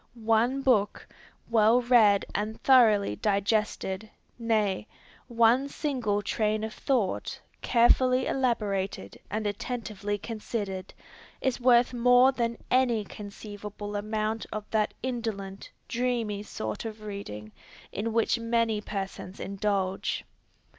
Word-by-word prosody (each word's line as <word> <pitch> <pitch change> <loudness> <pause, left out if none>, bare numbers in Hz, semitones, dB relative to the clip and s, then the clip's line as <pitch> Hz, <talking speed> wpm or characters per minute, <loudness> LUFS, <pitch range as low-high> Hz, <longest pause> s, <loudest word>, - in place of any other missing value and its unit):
One 230 +4 +1
book, 210 -6 +2 0.4
well 225 +1 +4
read 230 -5 +4
and 215 +2 -3
thoroughly 215 - +5
digested, 205 0 0 0.3
nay, 215 -3 0 0.4
one 240 +3 +3
single 245 -10 -1
train 215 +1 0
of 220 0 -4
thought, 240 -9 -1 0.2
carefully 255 +2 +4
elaborated 200 - -1
and 215 +1 -3
attentively 205 -1 -3
considered, 205 -3 -5 0.5
is 260 -2 -1
worth 245 0 +5
more 245 +2 +5
than 235 -3 -2
any 245 -4 +3
conceivable 205 0 -8
amount 215 +1 -2
of 215 -1 -4
that 215 -1 +1
indolent, 220 -6 -4 0.2
dreamy 235 -4 -1
sort 110 - -5
of 220 -1 -7
reading 155 - -7 0.4
in 220 +3 -3
which 230 +1 +1
many 230 -2 +1
persons 195 -2 -6
indulge. 195 -1 -2
215 Hz, 105 wpm, -28 LUFS, 205-235 Hz, 0.5 s, thoroughly